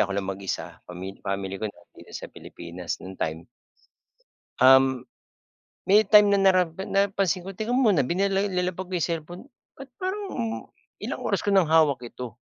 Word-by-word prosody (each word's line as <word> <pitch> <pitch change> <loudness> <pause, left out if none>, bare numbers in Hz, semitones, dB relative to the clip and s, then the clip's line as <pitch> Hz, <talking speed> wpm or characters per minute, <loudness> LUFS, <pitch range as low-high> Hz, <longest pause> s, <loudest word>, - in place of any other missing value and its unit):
ako 100 -1 +1
lang 100 - -1
mag-isa, 95 0 -5
pamil 90 +2 -8
family 95 0 -4
ko 110 - -1
nandito - - -16
sa - - -9
Pilipinas 85 0 -7
nung 95 0 -9
time 80 +3 -3 1.1
Um, 130 -1 +5 0.8
may 210 +2 +6
time 210 0 +7
na 200 - +4
nara 185 -1 +5 0.3
na 200 0 +3
napansin 190 -2 0
ko, 190 +1 -9
teka 220 +3 -2
muna 210 - +3
binila 195 +5 0
nilapag 185 -1 -2
ko 185 - -10
'yung 175 - 0
cellphone, 170 +2 -5 0.3
ba't 270 -1 -11
parang, 385 +3 -3
um, 230 -2 -3 0.4
ilang - - -4
oras - - 0
ko 205 - -1
ng 190 -3 +4
hawak 150 -6 +3
ito? 120 -1 -8
175 Hz, 170 wpm, -25 LUFS, -, 1.1 s, time